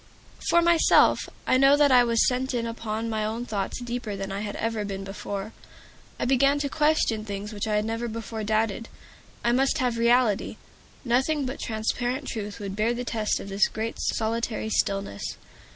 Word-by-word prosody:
For 340 - +5
myself, 340 -1 +5 0.3
I 255 - +3
know 275 +2 +6
that 290 -2 +4
I 250 -1 +7
was 230 -1 +3
sent 255 +1 -1
in 235 -1 -1
upon 225 -1 -4
my 220 -1 -1
own 225 +3 -3
thoughts 205 -1 -3
deeper 240 -3 -4
than 195 0 -5
I 195 - -3
had 205 -1 -4
ever 225 -1 -2
been 195 -1 -5
before. 195 +1 -6 0.7
I - - 0
began 275 +3 +3
to 285 -1 -2
question 295 -8 +1
things 205 0 -6
which 205 +1 -3
I 210 - +1
had 210 0 +1
never 230 +2 -2
before 225 -1 -5
doubted. 220 +1 0 0.5
I 235 - +3
must 265 +2 +2
have 245 -2 0
reality. 235 -3 +2 0.5
Nothing 265 +4 +1
but 260 +2 -5
transparent 245 +5 -2
truth 210 -2 -5
would 200 -1 -5
bear 220 +3 +1
the 245 +1 -4
test 220 -3 -1
of 200 - -8
this 195 +1 +3
great, 220 +1 -4
solitary 225 0 -1
stillness. 195 - -1
230 Hz, 185 wpm, -26 LUFS, 210-250 Hz, 0.7 s, I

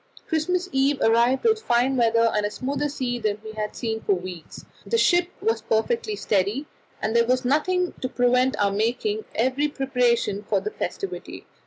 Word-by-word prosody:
Christmas 360 +2 0
Eve 270 +1 +2
arrived 235 +3 +3
with 440 -1 +3
finer 245 - +2
weather 230 -1 +3
and 210 - +1
a 205 - 0
smoother 280 +6 -2
sea 250 -4 -3
than 215 -2 -1
we 220 - -7
had 215 -1 -4
seen 220 -2 -3
for 200 - +1
weeks. 180 -2 -8 0.2
The 460 - 0
ship 350 -5 +3
was 225 0 0
perfectly 420 - 0
steady, 210 - 0 0.4
and 220 +2 -1
there 235 0 +4
was 255 +1 +1
nothing 360 +7 +1
to 255 - -2
prevent 250 +1 +2
our 200 -1 +2
making 245 - -1
every 260 +5 +1
preparation 250 -7 0
for 210 - 0
the 425 - -4
festivity. 395 - -5
250 Hz, 175 wpm, -24 LUFS, 220-295 Hz, 0.4 s, there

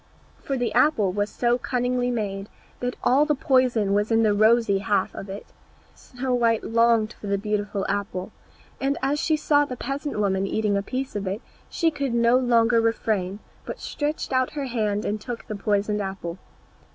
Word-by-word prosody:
For 275 - -2
the 240 -3 -1
apple 240 -6 +3
was 205 +2 -1
so 240 0 +1
cunningly 250 -1 0
made, 205 -4 -3 0.3
that 245 0 -2
all 270 +4 +4
the 300 0 +1
poison 250 -7 +2
was 205 +1 +1
in 225 0 +4
the 215 -1 +3
rosy 215 -1 +4
half 200 -1 0
of 195 - -8
it. 195 +2 -7 0.5
Snow 255 0 -4
white 230 -2 +2
longed 230 -1 +2
for 210 - -10
the 200 0 +1
beautiful 205 -1 -2
apple, 195 -2 -3 0.5
and 275 +1 0
as 285 +2 +1
she 310 +1 +1
saw 290 -1 +3
the 255 -3 -5
peasant 275 0 -4
woman 195 -1 +1
eating 210 0 0
a 200 - +1
piece 260 +5 -4
of 200 -1 -3
it 200 +6 -3 0.3
she 330 -2 +1
could 275 -5 -2
no 235 +1 +4
longer 235 -2 +3
refrain, 215 -3 -1 0.2
but - - -7
stretched 295 -2 -3
out 255 +1 +1
her 290 -2 -3
hand 215 -5 -1
and 210 0 -2
took 240 0 -6
the 215 - -5
poisoned 210 0 0
half. 195 -2 -5
230 Hz, 185 wpm, -24 LUFS, 205-255 Hz, 0.5 s, all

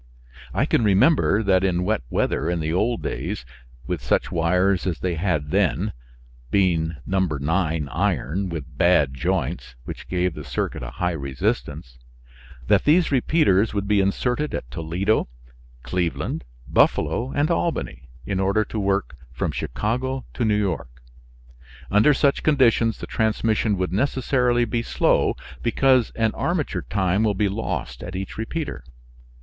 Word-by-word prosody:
I - - +1
can - - +2
remember 110 - +4
that 95 -2 +3
in 90 -2 +1
wet 105 -6 0
weather - - 0
in 85 -1 0
the 80 0 -2
old 115 +6 0
days, 60 - -4 0.4
with 90 -5 -3
such 60 - 0
wires 90 +3 +2
as 85 -3 -1
they 90 -1 -1
had 80 -4 -1
then 100 0 +1 0.6
(being 85 -2 +1
No. 95 0 0
9 80 -1 0
iron 90 +1 -1
with 75 -4 -7
bad 80 -6 +4
joints, 60 -1 -2
which - - -8
gave 90 -1 0
the 75 - -8
circuit - - -3
a - - -5
high 90 +7 -1
resistance) 65 -3 -3 0.7
that - - +3
these 160 +2 +4
repeaters 120 - +2
would 100 0 -1
be 105 -1 +3
inserted 125 +9 0
at - - -6
Toledo, 85 - 0 0.6
Cleveland, 85 -7 -2 0.2
Buffalo 125 +3 +2
and 145 +4 +1
Albany 165 - -2 0.2
in 95 -2 -2
order 100 +3 +2
to 110 - -4
work 100 -6 0 0.2
from 65 - -2
Chicago 125 - -2
to 120 - -2
New 105 -2 +2
York. 70 -11 -3 0.9
Under 105 +9 +5
such 140 0 +2
conditions 120 -6 +3
the - - -6
transmission 110 -1 0
would 90 -1 -2
necessarily 125 0 +1
be 115 +1 -1
slow, - - +2 0.3
because 130 +1 +3
an 110 -1 +1
armature 155 - -2
time 95 -1 +1
will 105 -2 +2
be 105 +2 +1
lost 95 - -4
at 90 +2 -7
each 95 0 -5
repeater. 150 +7 -4
95 Hz, 145 wpm, -23 LUFS, 85-115 Hz, 0.9 s, Under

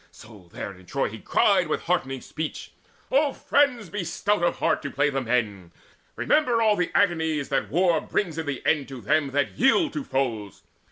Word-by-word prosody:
So 105 -6 -15
there - - -6
in 90 -1 -18
Troy 140 - -1
he 110 +1 -9
cried 185 - +2
with 155 - -1
heartening 135 -7 -1
speech: 155 -1 -6 0.4
"O 280 +1 +3
friends, 250 -9 +1
be 205 -2 -3
stout 205 +3 -1
of 175 - +1
heart - - 0
to 145 - -4
play 145 +2 +1
the 135 0 -1
men! 110 -8 -1 0.4
Remember 235 - +2
all 215 -2 +4
the 180 -3 -1
agonies 160 -7 +1
that - - -1
war 170 0 +2
Brings 165 -6 -2
in 160 - -4
the 140 -3 -4
end 145 -4 +1
to 135 -2 -8
them 145 +5 +1
that 140 +1 -1
yield 280 +5 +3
to 295 - -3
foes. 115 - -3
155 Hz, 190 wpm, -25 LUFS, 130-200 Hz, 0.4 s, all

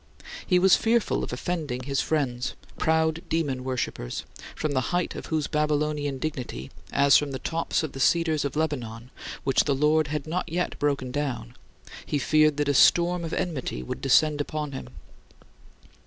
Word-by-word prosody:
He 180 - +4
was 185 +1 +6
fearful 230 0 +1
of - - -5
offending 130 -1 -3
his 140 0 0
friends, 130 -6 -1 0.2
proud 160 0 +2
demon 145 -6 -1
worshipers, 125 - -3 0.3
from 155 - -2
the 130 -2 0
height 175 -1 0
of - - -7
whose 155 -2 0
Babylonian 150 -2 0
dignity, 125 - -5 0.2
as 140 -1 +5
from 150 - -1
the 135 - -4
tops 165 +5 -1
of 155 - -3
the 135 - -8
cedars 160 +2 +2
of 140 -1 -3
Lebanon 125 -6 -3 0.3
which 135 -1 +2
the 140 - +2
Lord 150 +2 +3
had 150 -1 -3
not 170 +3 -3
yet 180 +1 -2
broken 140 -3 0
down, 135 - -3 0.5
he 150 - -1
feared 155 +1 +3
that 145 -1 0
a 145 - +3
storm 175 +5 +4
of 165 - -4
enmity 130 - -3
would - - -6
descend 150 +2 +4
upon 150 0 -4
him. 135 - -6
150 Hz, 170 wpm, -26 LUFS, 135-160 Hz, 0.5 s, was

